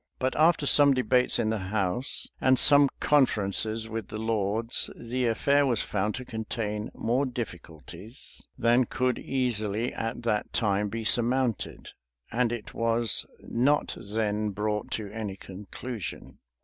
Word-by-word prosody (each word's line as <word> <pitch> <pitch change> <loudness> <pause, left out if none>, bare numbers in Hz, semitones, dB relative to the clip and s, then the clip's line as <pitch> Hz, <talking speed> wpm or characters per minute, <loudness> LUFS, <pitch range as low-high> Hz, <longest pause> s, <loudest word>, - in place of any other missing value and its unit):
But 130 0 -1
after 155 -1 +3
some 140 -1 +6
debates 125 0 +2
in 110 -2 0
the 110 - -1
house, 95 +5 -1
and 130 0 +4
some 145 +1 +7
conferences 110 -5 +2
with 110 -2 -5
the 110 - -6
lords, 110 +1 -1
the 125 +1 -2
affair 140 +5 +3
was 120 -5 +1
found 105 +1 -1
to 125 - -6
contain 110 -2 -4
more 120 +5 0
difficulties 110 - -8
than 120 +2 +3
could 125 +1 -1
easily, 120 -3 -1
at 115 +1 -4
that 105 -3 -1
time, 105 -2 +1
be 115 +2 -4
surmounted; 120 0 +1 0.4
and 120 0 +1
it 120 -3 -6
was 115 -1 +1
not 140 +5 +1
then 105 0 -1
brought 105 +1 -2
to 105 -2 -4
any 105 -3 -5
conclusion. 100 +2 -8
115 Hz, 135 wpm, -27 LUFS, 105-125 Hz, 0.4 s, some